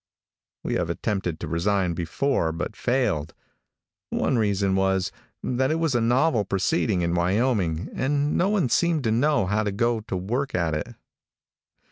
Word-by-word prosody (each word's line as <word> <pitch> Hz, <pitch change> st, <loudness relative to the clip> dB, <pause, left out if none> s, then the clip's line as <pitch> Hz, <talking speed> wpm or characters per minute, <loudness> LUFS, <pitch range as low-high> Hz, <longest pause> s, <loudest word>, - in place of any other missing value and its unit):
We -, -, -2 dB
have -, -, -2 dB
attempted 95 Hz, -6 st, -2 dB
to 85 Hz, -, -4 dB
resign 90 Hz, +3 st, 0 dB
before, 85 Hz, -, 0 dB
but 85 Hz, +6 st, -4 dB
failed. 110 Hz, -, 0 dB, 0.7 s
One -, -, 0 dB
reason 100 Hz, -3 st, +1 dB
was, 95 Hz, -1 st, +1 dB, 0.3 s
that 130 Hz, +1 st, 0 dB
it 155 Hz, -, +1 dB
was 165 Hz, -3 st, 0 dB
a 120 Hz, -, +2 dB
novel 120 Hz, +1 st, +2 dB
proceeding 95 Hz, -2 st, 0 dB
in 85 Hz, 0 st, 0 dB
Wyoming, 90 Hz, -2 st, +1 dB
and 145 Hz, +2 st, 0 dB
no 185 Hz, -, +2 dB
one 195 Hz, -11 st, +1 dB
seemed 165 Hz, +1 st, +2 dB
to 110 Hz, -, +1 dB
know 140 Hz, 0 st, +2 dB
how 105 Hz, +3 st, +1 dB
to 105 Hz, -1 st, -1 dB
go 115 Hz, +3 st, +1 dB
to 100 Hz, -3 st, -4 dB
work 120 Hz, +9 st, -2 dB
at 85 Hz, -3 st, 0 dB
it. 75 Hz, -, -4 dB
105 Hz, 160 wpm, -25 LUFS, 90-130 Hz, 0.7 s, a